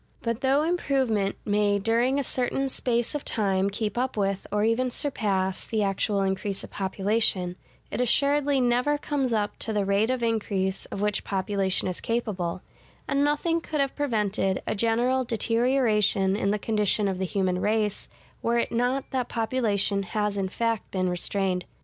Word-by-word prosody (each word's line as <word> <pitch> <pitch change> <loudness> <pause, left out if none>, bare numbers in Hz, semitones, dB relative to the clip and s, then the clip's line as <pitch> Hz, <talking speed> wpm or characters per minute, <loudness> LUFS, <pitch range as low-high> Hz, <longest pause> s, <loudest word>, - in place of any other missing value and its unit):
But 230 -1 -2
though 275 +3 +3
improvement 265 - 0
may 205 -1 +2
during 235 +6 +1
a - - 0
certain 265 +2 -1
space 240 -1 0
of 295 - -3
time 195 -2 0
keep 210 +2 -2
up 255 -2 -2
with, 195 -1 -1
or 210 0 +1
even 230 +3 +2
surpass, 200 -8 -1
the 220 -2 -1
actual 195 +1 0
increase 195 +1 -2
of - - -10
population, 195 -2 0 0.4
it - - -1
assuredly 280 +3 +2
never 250 +4 +2
comes 285 -3 -1
up 210 -2 -1
to 225 - -2
the 205 -2 0
rate 200 +3 +2
of 255 -2 -1
increase 200 -4 -1
of 195 - -6
which 210 -1 0
population 195 -1 0
is 185 - -3
capable: 195 -7 -2 0.4
and 280 +1 +1
nothing 330 +3 +1
could 310 -2 -3
have 275 -1 0
prevented 210 -8 0
a - - -1
general 235 +4 +1
deterioration 230 -4 +2
in 200 -1 0
the 210 - +1
condition 210 -1 +1
of 190 -1 -2
the - - -1
human 185 -1 0
race, 210 -1 0 0.3
were 235 +1 +1
it 235 - 0
not 250 +3 0
that 255 -2 -1
population 220 -4 +1
has 210 +1 -2
in 195 -1 -1
fact 230 +1 -1
been 185 -1 0
restrained. 180 +1 -1
220 Hz, 170 wpm, -26 LUFS, 195-250 Hz, 0.4 s, though